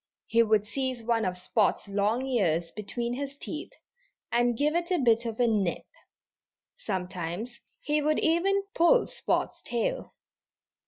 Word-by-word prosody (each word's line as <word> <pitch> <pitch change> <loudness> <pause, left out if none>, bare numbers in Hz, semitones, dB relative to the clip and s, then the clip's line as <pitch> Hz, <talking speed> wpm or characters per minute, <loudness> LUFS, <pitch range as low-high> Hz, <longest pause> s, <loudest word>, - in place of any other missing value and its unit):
He 230 - +3
would 215 -2 +3
seize 255 +1 -3
one 225 -1 +1
of 180 -1 -2
Spot's 205 +4 0
long 205 +5 0
ears 175 -10 +1
between 235 +3 -3
his 280 +2 -5
teeth 305 +2 -6 0.6
and 240 -1 +2
give 295 +3 +2
it 345 0 0
a 365 - +2
bit 235 -4 +3
of 225 0 -5
a 245 - +4
nip. 205 -6 0 0.9
Sometimes 185 +4 -4 0.2
he 300 +1 +1
would 305 +1 +2
even 380 +5 +2
pull 345 +9 +4
Spot's - - -2
tail. 245 - -3
235 Hz, 145 wpm, -28 LUFS, 205-285 Hz, 0.9 s, a